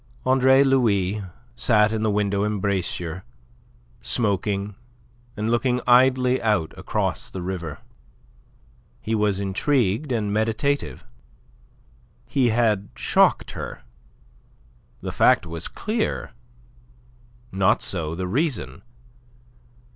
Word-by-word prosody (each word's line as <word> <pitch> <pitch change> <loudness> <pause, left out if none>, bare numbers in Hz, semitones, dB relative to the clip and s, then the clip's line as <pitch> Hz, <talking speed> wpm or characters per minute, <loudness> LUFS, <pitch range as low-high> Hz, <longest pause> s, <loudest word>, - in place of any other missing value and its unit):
Andre 130 +1 +5
Louis 105 -7 +2 0.3
sat 105 - +3
in 110 -1 -2
the 110 - +1
window 100 -1 0
embrasure, 95 -4 -2 0.8
smoking 100 - -1 0.6
and 110 +2 -1
looking 125 +1 +1
idly 125 +1 +4
out 105 -8 0
across - - -2
the 95 - -6
river. 85 -4 -5 1.2
He 110 - -4
was 105 -3 +1
intrigued 110 +5 0
and 105 -4 -1
meditative. 115 +7 -1 1.2
He 130 -3 +1
had 110 -4 +1
shocked - - +2
her. - - -7 1.2
The - - -4
fact - - +4
was 80 0 -6
clear; 220 +1 -3 1.2
not 95 -1 +2
so 80 -4 -2
the 90 +1 -3
reason. 140 - -2
105 Hz, 95 wpm, -23 LUFS, 95-125 Hz, 1.2 s, Andre